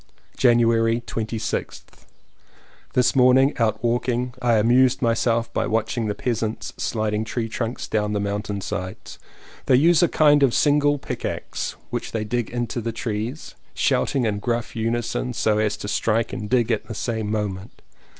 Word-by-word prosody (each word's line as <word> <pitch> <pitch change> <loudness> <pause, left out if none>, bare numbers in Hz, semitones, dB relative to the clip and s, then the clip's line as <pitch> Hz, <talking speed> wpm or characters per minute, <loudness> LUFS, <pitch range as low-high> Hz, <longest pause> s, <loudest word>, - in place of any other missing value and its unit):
January 115 -2 +3
26th. 110 -1 -5 0.9
This 125 +1 +2
morning 130 +2 +5
out 110 -1 0
walking 120 +1 0
I 120 -2 +3
amused 125 +4 +4
my 115 -2 +2
self 115 0 0
by - - 0
watching 110 +1 -1
the 105 - -2
peasants 115 -2 -3
sliding 110 -1 -1
tree 115 +1 -3
trunks 115 +1 -4
down 105 -1 -1
the 105 - 0
mountain 100 0 -3
sides. 95 0 -6 0.5
They 130 - +5
use 165 +6 +5
a 175 - +5
kind 150 -2 +4
of 135 -4 +3
single 145 0 +3
pick 140 - -6
axe, - - -4 0.2
which - - -4
they 110 -2 -1
dig 120 +1 -2
into 120 0 -3
the 115 +1 -3
trees, 115 +5 -4 0.2
shouting 135 -4 +1
in 105 -2 -1
gruff 120 +1 -2
unison 120 +2 -2
so 110 -2 +1
as 105 -1 0
to 105 - -6
strike 110 +2 0
and 105 -4 -5
dig 125 -2 +2
at 110 - -1
the 115 - -6
same 110 0 -2
moment. 105 -2 -4
115 Hz, 160 wpm, -23 LUFS, 110-125 Hz, 0.9 s, morning